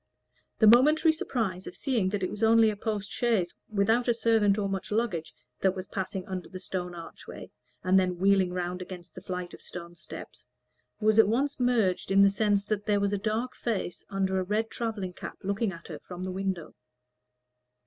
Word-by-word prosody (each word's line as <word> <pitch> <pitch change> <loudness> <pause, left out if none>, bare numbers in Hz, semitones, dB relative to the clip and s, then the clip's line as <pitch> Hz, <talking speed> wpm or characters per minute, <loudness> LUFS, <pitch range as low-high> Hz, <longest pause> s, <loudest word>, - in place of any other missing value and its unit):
The 220 - +4
momentary 300 +8 +6
surprise 215 - -2
of - - -8
seeing 235 -9 0
that 200 -1 -2
it 185 - -1
was 210 - -7
only 225 0 +6
a - - -5
post 205 -1 -3
chaise, 220 -8 +1 0.2
without 220 +4 +2
a 240 - +3
servant 220 -3 +3
or 205 -2 0
much 195 0 -4
luggage, 210 -7 -1 0.3
that 190 0 +2
was 185 -1 -5
passing 190 -1 -4
under 185 -1 -5
the 185 - -7
stone 180 -1 -4
archway 165 -1 -10 0.3
and 185 +1 +5
then 180 -1 0
wheeling 190 -1 +3
round 180 0 -3
against 180 -1 -9
the - - -9
flight 180 -1 -5
of - - -11
stone 170 -1 -8
steps, 175 - -10 0.5
was 215 0 +4
at 220 - +7
once 275 +6 0
merged 230 -9 +2
in 195 +1 +6
the 200 - +6
sense 205 -1 +1
that 210 -1 -2
there 205 -1 +3
was 200 0 0
a 205 - 0
dark 225 +4 -1
face 220 -8 -3
under 190 -1 0
a - - 0
red 215 +4 -1
travelling 210 -6 -3
cap - - -8
looking 200 +2 0
at 170 -2 -11
her - - -7
from 180 0 -8
the 185 - -3
window. 190 -3 -3
200 Hz, 200 wpm, -28 LUFS, 185-225 Hz, 0.5 s, at